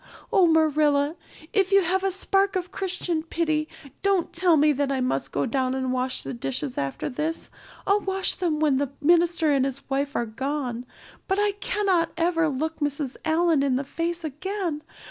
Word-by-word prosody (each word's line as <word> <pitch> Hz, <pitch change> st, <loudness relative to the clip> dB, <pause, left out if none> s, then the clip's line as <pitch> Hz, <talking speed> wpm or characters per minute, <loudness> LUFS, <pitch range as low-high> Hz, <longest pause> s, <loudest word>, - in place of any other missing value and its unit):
Oh, 370 Hz, -3 st, +6 dB
Marilla, 305 Hz, -2 st, +3 dB, 0.4 s
if 395 Hz, -2 st, +2 dB
you 395 Hz, -1 st, +5 dB
have 375 Hz, +3 st, +1 dB
a 390 Hz, -, +2 dB
spark 390 Hz, +1 st, +1 dB
of 365 Hz, 0 st, -2 dB
Christian 365 Hz, -4 st, -2 dB
pity 315 Hz, -2 st, -1 dB, 0.3 s
don't 395 Hz, -3 st, +1 dB
tell 350 Hz, -3 st, +4 dB
me 300 Hz, +1 st, +5 dB
that 280 Hz, 0 st, 0 dB
I 270 Hz, -, 0 dB
must 255 Hz, -, -1 dB
go 140 Hz, -, 0 dB
down 260 Hz, +1 st, 0 dB
and 260 Hz, -1 st, -1 dB
wash 255 Hz, 0 st, -1 dB
the 135 Hz, -, -5 dB
dishes 135 Hz, +2 st, -4 dB
after 140 Hz, -1 st, -3 dB
this. 305 Hz, +5 st, -3 dB, 0.3 s
I'll 400 Hz, +1 st, +3 dB
wash 385 Hz, -1 st, 0 dB
them 330 Hz, -5 st, -1 dB
when 300 Hz, -4 st, +3 dB
the 280 Hz, 0 st, -2 dB
minister 335 Hz, 0 st, +3 dB
and 270 Hz, -2 st, +3 dB
his 270 Hz, 0 st, -4 dB
wife 280 Hz, +1 st, -1 dB
are 235 Hz, -, 0 dB
gone, 250 Hz, +1 st, -4 dB, 0.4 s
but 385 Hz, -, +1 dB
I 415 Hz, 0 st, +3 dB
cannot 390 Hz, -4 st, 0 dB
ever 330 Hz, -1 st, +2 dB
look 315 Hz, +4 st, -3 dB
Mrs. 290 Hz, -2 st, -2 dB
Allan 320 Hz, -1 st, +3 dB
in 275 Hz, -2 st, +1 dB
the 270 Hz, -, -1 dB
face 335 Hz, +4 st, -3 dB
again. 325 Hz, +1 st, -3 dB
310 Hz, 185 wpm, -25 LUFS, 275-355 Hz, 0.4 s, Oh